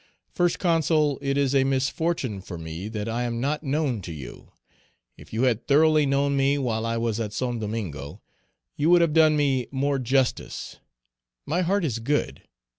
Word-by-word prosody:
"First 175 -1 +1
Consul, 155 -4 +2
it 140 0 -1
is 140 -1 +1
a 135 -1 +4
misfortune 135 - -1
for 90 -2 -8
me 80 +4 -6
that 105 -1 -4
I 115 +2 -2
am 120 -1 -2
not 145 +4 -1
known 140 -6 -1
to 85 - -7
you. 70 -6 -10 0.6
If - - -16
you 115 +3 -1
had 125 -3 +1
thoroughly 155 0 +4
known 140 +1 +1
me 140 +1 +2
while 115 -4 -1
I 115 0 -1
was 115 -1 -1
at 105 -2 -3
St. 120 +1 -2
Domingo, 95 -11 -5 0.6
you 150 +3 +1
would 175 0 +6
have 165 -3 +2
done 155 -1 +5
me 135 -4 +1
more 140 +1 0
justice; 130 +1 -1 0.7
my 170 +5 0
heart 185 +1 +1
is 120 -6 -2
good. 145 +6 -1
135 Hz, 180 wpm, -25 LUFS, 115-150 Hz, 0.7 s, would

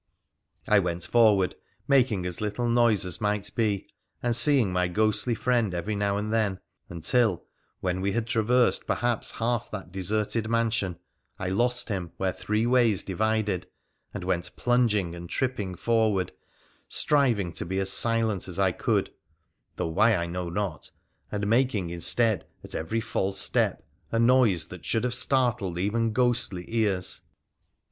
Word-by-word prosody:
I - - +5
went 85 0 -2
forward, 105 -4 +4 0.3
making 125 -9 +3
as 90 +1 -2
little 105 +3 -2
noise 115 -4 +3
as 90 - 0
might 105 -1 -1
be, 105 -4 -1 0.4
and 120 -1 +1
seeing 125 -8 +3
my 90 0 +1
ghostly 110 +5 0
friend 115 -6 0
every 100 +5 -2
now 100 0 0
and 105 +1 -3
then, 105 -4 0 0.3
until, 95 +4 +1 0.4
when 90 0 -1
we 100 0 0
had 115 -1 -1
traversed 120 +1 +2
perhaps 120 -2 0
half 115 0 -1
that 95 -4 -7
deserted 105 +4 -1
mansion, 115 -6 0 0.4
I 90 - -3
lost 120 +6 0
him 90 -5 -4
where 95 -1 -1
three 105 +2 -1
ways 120 -5 +3
divided, 105 -1 -1 0.4
and - - -6
went 90 -1 -2
plunging 115 -8 +1
and 85 0 -9
trip 130 -1 -1
ping 95 -3 -4
forward, 110 -2 +1 0.6
striving 120 - +1
to - - -3
be 95 +2 -2
as 95 0 +3
silent 115 -4 +2
as 90 - -5
I 95 -1 +3
could - - 0 0.3
— - - -49
though - - -2
why 105 +7 +3
I 85 -2 -1
know 90 0 -4
not 90 -3 -4 0.2
— - - -42
and 105 -1 -2
making 110 -5 +1
instead 100 +3 +1 0.2
at - - -10
every 110 +9 -2
false 95 -3 -2
step - - 0 0.2
a 115 - 0
noise 115 -9 +3
that 90 -5 -10
should 115 - 0
have 125 -1 -1
startled 120 -8 +1
even 110 +5 0
ghostly 120 -7 0
ears. 105 -5 +1
105 Hz, 160 wpm, -26 LUFS, 95-115 Hz, 0.6 s, I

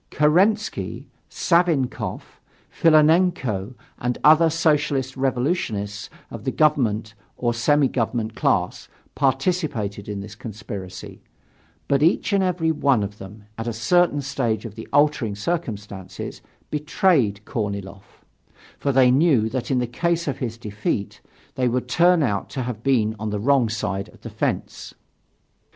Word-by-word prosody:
Kerensky, 190 +8 +1 0.2
Savinkoff, 170 -7 0 0.3
Filonenko 155 - +3 0.2
and 125 0 -1
other 160 +2 +6
Socialist 150 -5 +1
Revolutionists 125 - -2 0.2
of - - -8
the - - -1
government 115 -8 +1 0.2
or 120 -1 0
semi 140 +4 +3
government 115 -2 -2
class - - 0 0.3
participated 135 - -1
in 100 -1 -4
this 105 +1 -9
conspiracy, 105 -4 -8 0.7
but 140 0 +2
each 175 +6 +2
and 195 -1 +3
every 175 -3 +1
one 140 -7 +2
of 100 +1 -6
them 100 +2 -11 0.2
at 115 - -4
a 120 - -1
certain 145 +6 +2
stage 120 -6 -2
of 110 - -7
the 110 - -9
altering 145 -7 +2
circumstances 105 - -5 0.3
betrayed 150 - +1
Korniloff, 100 -4 -6 0.5
for 140 - 0
they 130 -1 +5
knew 135 -6 +3
that 125 +1 -4
in 130 - +1
the 125 - +1
case 170 +7 -1
of 140 - -2
his 115 -3 -4
defeat, 105 -2 -3 0.3
they 130 -2 0
would 125 +1 -1
turn 175 +4 +4
out 100 -7 -1
to 130 - -4
have 120 -3 -5
been 115 -5 +1
on 110 0 -3
the 105 0 -2
wrong 130 0 +3
side 100 -3 -3
of - - -20
the - - -8
fence. - - -3
125 Hz, 135 wpm, -23 LUFS, 105-150 Hz, 0.7 s, other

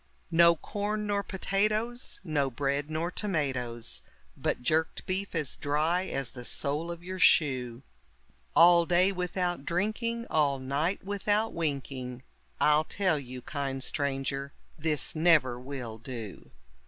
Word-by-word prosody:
No 170 0 +6
corn 210 +5 -3
nor 205 -1 0
potatoes, 215 +5 -1
no 150 -6 0
bread 140 +3 -1
nor 160 +3 -2
tomatoes, 130 - -1 0.3
But - - -2
jerked 160 +5 0
beef 190 0 -1
as 150 -5 -2
dry 155 +6 +1
as 135 -4 -3
the 125 - -9
sole 150 +6 -1
of 170 0 -6
your 185 +1 -6
shoe; 130 - +3 0.7
All 170 0 +7
day 180 +2 +4
without 180 -3 -2
drinking, 220 +7 -1
all 145 -3 +2
night 140 +8 -1
without 205 +2 0
winking, 135 -5 -3 0.4
I'll 150 +1 +4
tell 185 -6 +1
you, 125 -2 -8
kind 135 -2 -3
stranger, 140 -1 -2 0.2
this 155 -1 +1
never 155 -7 +4
will 125 -4 -6
do. 115 -4 -7
155 Hz, 130 wpm, -29 LUFS, 135-185 Hz, 0.7 s, All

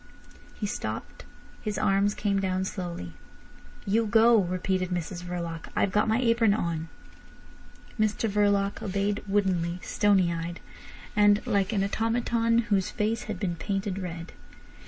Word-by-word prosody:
He 210 - -3
stopped, 110 - -5 0.4
his 210 -2 -3
arms 200 +1 +2
came 200 -2 0
down 185 0 0
slowly. 170 - -5 0.7
"You 220 +3 +2
go," 225 +1 +6
repeated 185 0 -1
Mrs 175 0 -3
Verloc. 170 -2 -5
"I've 195 - +2
got 210 +2 +2
my 220 +2 +2
apron 230 -4 +3
on." 165 -5 -2 1.1
Mr 215 +1 +1
Verloc 205 -1 +1
obeyed 200 +1 -1
woodenly, 185 -4 +1
stony 190 -4 +2
eyed, 170 +1 -4 0.6
and 205 0 +4
like 200 0 +1
an 200 -3 +1
automaton 230 +2 +1 0.2
whose 190 -2 +2
face 220 0 -1
had 215 -4 -5
been 175 -4 -1
painted 195 +2 -2
red. 170 -2 -6
195 Hz, 135 wpm, -27 LUFS, 180-210 Hz, 1.1 s, go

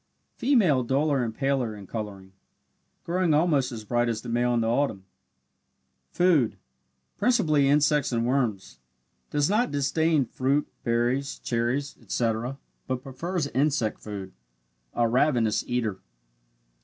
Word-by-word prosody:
Female 210 - +3
duller 135 +2 +1
and 115 - -2
paler 135 -5 0
in 100 -1 -10
colouring, 100 -2 -6 0.7
growing 175 -2 +1
almost 150 -5 +2
as 115 -3 -6
bright 120 +2 0
as 110 -2 -3
the 120 - -7
male 120 +1 +1
in 115 - +2
the 115 - 0
autumn. 115 -5 0 1.0
Food 165 -10 +2 0.6
principally 160 - +3
insects 150 0 +3
and 115 -1 0
worms 110 - -1 0.5
does 145 0 +1
not 220 +5 +2
disdain 145 +1 +1
fruit, 135 +4 0 0.2
berries, 120 +4 0
cherries, 120 +4 -2
etc., 120 +3 -2 0.3
but 130 -1 -3
prefers 165 +5 -3
insect 135 -5 0
food 100 -3 -7 0.6
a 120 - +2
ravenous 120 -3 +2
eater. 115 -6 -1
130 Hz, 125 wpm, -26 LUFS, 115-150 Hz, 1.0 s, Female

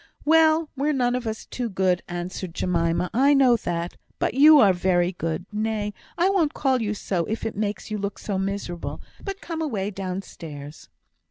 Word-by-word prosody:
"Well! 320 +1 +5
we're 290 +3 +1
none 245 -3 +1
of 250 -2 -2
us 220 0 -4
too 245 -2 -4
good," 185 -2 +1
answered 175 0 -5
Jemima; 170 0 0
"I 275 +4 +5
know 260 -3 +5
that. 175 -3 -3 0.2
But - - 0
you 300 +4 +8
are 205 -8 +6
very 175 0 +2
good. 165 -1 -3
Nay, 210 -1 -1 0.2
I 350 +2 +3
won't 360 -6 +2
call 265 -3 +1
you 210 -1 -1
so, 180 -4 -1
if 220 +2 -3
it 225 - -3
makes 205 0 -3
you 210 - -2
look 200 0 -3
so 195 -3 -3
miserable. 190 -3 -4 0.2
But 390 -1 -5
come 330 -1 -4
away 210 -10 -2
downstairs." 170 -6 -7
210 Hz, 180 wpm, -24 LUFS, 180-265 Hz, 0.2 s, you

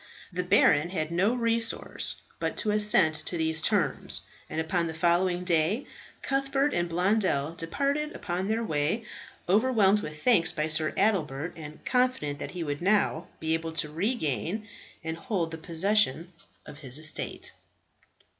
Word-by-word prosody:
The 180 - -1
baron 170 -3 +4
had 160 -3 -2
no 195 +8 +2
resource 230 -1 -1 0.2
but - - -2
to 215 - +1
assent 210 -6 +4
to 175 - -3
these 160 0 0
terms, 175 -7 0 0.3
and - - -3
upon 170 +1 0
the 160 - -5
following 175 +2 +2
day 180 - +1 0.4
Cuthbert 275 +1 +1
and 175 0 0
Blondel 180 -4 +1
departed 280 - -2
upon 180 +1 -3
their 225 +2 0
way, 160 +6 -1 0.4
overwhelmed 210 0 +4
with 155 -5 -8
thanks 225 -10 +4
by 155 +1 -2
Sir 155 0 +1
Adelbert, 170 -7 +1
and 155 -1 -10
confident 250 - +1
that - - -5
he 170 - -2
would 145 -1 -3
now 185 -3 +2
be 160 0 0
able 165 0 -2
to 155 -2 -2
regain 180 - -2 0.4
and 160 0 -4
hold 170 -2 -2
the 160 - -6
possession 175 -1 +1 0.3
of 145 - -11
his 135 -3 -1
estate. 155 0 -1
175 Hz, 150 wpm, -28 LUFS, 160-210 Hz, 0.4 s, baron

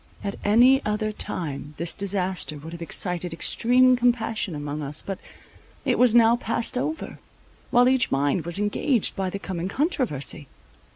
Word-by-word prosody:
At 200 -1 -4
any 245 +6 +5
other 215 0 -1
time 150 -7 -5
this 170 +1 -1
disaster 190 -5 -2
would 160 +3 -10
have 170 - -9
excited 175 0 -1
extreme 250 +8 +4
compassion 225 -6 0
among 145 +1 -5
us; 145 +1 -3
but 195 -1 -5 0.7
it - - +1
was 245 -2 +4
now 230 0 +6
passed 235 0 -2
over, 310 +6 -3 0.5
while 245 +1 +5
each 260 0 +3
mind 145 +5 0
was 170 +2 -4
engaged 210 +4 +1
by 190 -1 -2
the 200 - -4
coming 185 -3 -4
controversy. 195 - -2
200 Hz, 155 wpm, -24 LUFS, 165-240 Hz, 0.7 s, now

